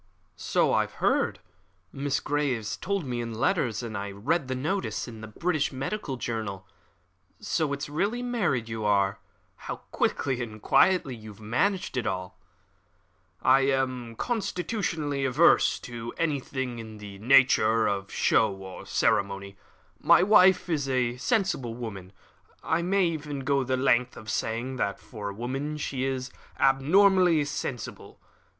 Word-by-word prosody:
"So - - +1
I - - +2
heard. - - 0 0.5
Miss 140 0 -1
Grey 145 -5 0
told 170 - -3
me 120 -2 -2
in 115 -1 -5
her - - -7
letters, 125 - 0
and 115 -2 -5
I 100 0 -3
read 130 - -1
the 130 - -2
notice 160 +8 -2
in 115 -2 -9
the 110 - -7
British 155 +6 -1
Medical 135 +2 -4
Journal. 110 -6 -4 0.7
So 155 -3 -1
it's 140 +1 -3
really 200 +11 -1
married 195 - 0
you 110 -1 -4
are. 100 -1 +2 0.4
How - - -5 0.2
quickly 130 -3 0
and 110 -2 -6
quietly 175 - +3
you 110 -1 -11
have 105 - -13
managed 130 - 0
it 120 - -1
all!" 95 -2 -4 1.0
"I 135 - +6
am 130 -3 -1
constitutionally 180 - -2
averse 135 +6 +4
to 120 -1 -7
anything 130 -6 -2
in 110 -1 -9
the 100 -2 -10
nature 115 -2 +5
of 100 -1 -2
show 110 - +3
or 95 -1 -10
ceremony. 100 0 0 0.4
My 175 - +5
wife 190 -2 +5
is 145 -5 -1
a 125 -2 0
sensible 185 - 0
woman 100 -6 -7 0.5
I 160 +1 +1
may 190 +2 +2
even 150 -4 -3
go 140 0 +1
the 130 0 0
length 125 -1 +2
of 110 0 -6
saying 120 +4 -2
that, 100 -4 -1
for 105 -4 -7
a - - -6
woman, 135 +6 -3
she 135 -3 -2
is 130 0 -3 0.3
abnormally 170 +4 +4
sensible. 140 -5 -6
130 Hz, 145 wpm, -27 LUFS, 110-150 Hz, 1.0 s, I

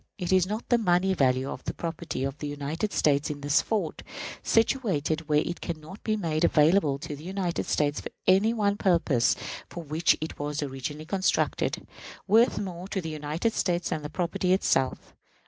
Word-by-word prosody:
Is 185 -1 +2
not 215 +3 -4
the 240 - +4
money 185 -2 +3
value 130 -4 +2
of - - -6
the - - -3
property 165 -5 -4
of 135 0 -2
the 150 - -4
United 145 +8 -3
States 145 -3 +2
in 145 -1 -5
this 145 0 +3
fort, 200 -9 -2 0.4
situated 165 - +1
where 150 +1 +4
it 175 - -4
can 165 -3 -4
not 160 +7 -12
be 215 -1 0
made 165 -5 -1
available 155 -2 +4
to 150 +1 -6
the 145 - -12
United 185 -1 -2
States 145 -1 +1
for - - -6 0.2
any 195 +4 +5
one 205 -3 +1
purpose 170 - +3 0.3
for 170 - -7
which 160 +2 +2
it 155 - -6
was 145 +1 -2
originally 145 +3 -5
constructed, 190 +3 0 0.4
worth 225 +5 +4
more 185 -2 -5
to 195 - -2
the 160 -3 -4
United 155 +8 -2
States 175 -1 0
than 155 - -2
the 150 - -6
property 180 +2 0
itself? 135 -8 0
165 Hz, 180 wpm, -27 LUFS, 150-190 Hz, 0.4 s, any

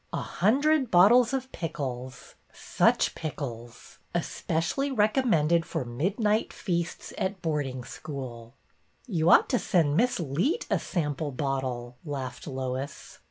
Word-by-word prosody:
A - - -2
hundred 270 - +2
bottles 225 +7 +6
of 265 -1 -3
pickles, 130 -6 -5 0.2
— - - -32 0.3
such - - +4
pickles! 120 -7 -7 0.2
Especially 175 - -1
rec 215 -4 +3
ommended 170 - +3
for 130 - -3
midnight 200 - 0
feasts 170 -3 -3
at 190 +1 -1
boarding 140 -6 -2
school! 120 -4 -8 0.3
" - - -36
You 170 -8 +1
ought - - +7
to 250 - +2
send 160 -6 +2
Miss 245 +5 +2
Leet 175 - 0
a - - +3
sample 150 -4 -2
bottle," 130 -3 -3
laughed 140 -4 -5
Lois. 130 +1 -5
160 Hz, 130 wpm, -28 LUFS, 130-210 Hz, 0.3 s, ought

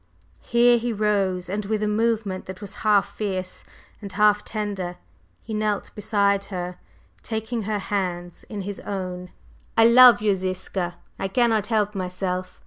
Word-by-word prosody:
Here 240 0 +4
he 240 +1 -2
rose, 200 -4 0
and 200 +3 -3
with 215 +1 -1
a - - +1
movement 215 -3 0
that 190 0 -7
was 205 -2 -8
half 205 -2 +2
fierce 190 -3 -4 0.4
and 200 -2 -7
half 210 0 +3
tender, 200 -5 -4 0.5
he 220 - -6
knelt 215 -1 -1
beside 200 -1 +1
her, 180 -2 -5 0.4
taking 220 +1 -3
her 210 - 0
hands 180 -3 -3
in 205 -2 -6
his 200 0 -5
own. 180 -2 -5 0.5
"I 225 - +7
love 245 0 +8
you, 210 -1 +2
Ziska! 185 -1 -3 0.2
I 195 - -1
cannot 220 0 +2
help 210 -2 +1
myself. 185 -1 -3
205 Hz, 150 wpm, -24 LUFS, 185-215 Hz, 0.5 s, love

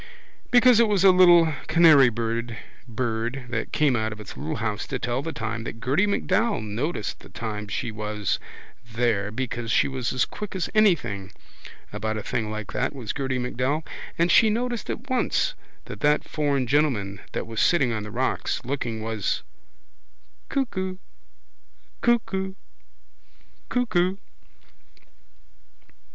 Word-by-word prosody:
Because 245 -2 +6
it 235 - +5
was 200 -3 +2
a 195 - +9
little 175 -3 +6
canarybird 120 -8 +4 0.3
that 120 +1 -3
came 145 -4 +3
out 110 -1 -1
of 105 - -8
its 105 - -9
little 80 - -4
house 105 -1 -3
to 135 - -2
tell 120 +2 -2
the 165 - -4
time 115 -4 -4
that 115 - -6
Gerty 145 - +2
MacDowell 205 - +1
noticed 110 +4 -3
the - - -14
time 105 -2 -5
she 115 +3 -3
was 105 -2 -2 0.5
there 115 -4 +1
because 120 0 -4
she - - +3
was 130 -3 -2
as 130 - +1
quick 210 -2 -7
as 185 - -2
anything 165 - +2 0.6
about 110 +1 -2
a 105 - -4
thing 110 0 -2
like 110 -1 -5
that, - - -1
was 120 -6 -4
Gerty 130 -2 -2
MacDowell, 130 +5 -1 0.3
and 170 +1 +3
she 220 +3 +6
noticed 240 +1 -2
at 245 - -4
once 260 - +1 0.3
that - - -8
that 150 0 +3
foreign 145 -4 0
gentleman 120 -8 +1
that - - -2
was 115 -1 -2
sitting 140 -9 +3
on 110 - -2
the 105 - -7
rocks 125 +5 -1
looking 120 -4 -3
was 110 -3 -2 1.1
Cuckoo 190 -9 -2 1.0
Cuckoo 190 -5 +1 1.1
Cuckoo. 190 -7 +1
130 Hz, 140 wpm, -25 LUFS, 110-175 Hz, 1.1 s, a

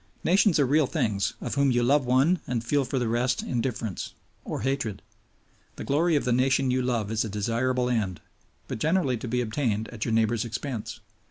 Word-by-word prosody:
Nations 190 -1 +4
are 140 - +4
real 145 +2 +3
things, 100 -5 -1
of - - -4
whom 140 0 +3
you 120 -1 +2
love 135 +1 +3
one 135 +8 +3
and 120 -2 -2
feel 140 +3 +1
for 130 +2 -2
the 120 -2 0
rest 125 +2 0
indifference 115 -5 -3 0.3
or - - -4
hatred. 130 -4 -2 0.7
The - - -6
glory 160 +4 +2
of 145 - +1
the 125 - +1
nation 130 +1 +2
you 130 0 +1
love 115 -4 -1
is 110 -1 +1
a 110 - -4
desirable 120 +5 0
end, 105 -7 -1 0.5
but - - -5
generally 155 -5 +1
to 120 - -6
be 125 +2 0
obtained 110 -2 -1
at 115 -3 -5
your 115 - -1
neighbor's 115 0 +2
expense. 115 0 -5
125 Hz, 195 wpm, -26 LUFS, 115-135 Hz, 0.7 s, Nations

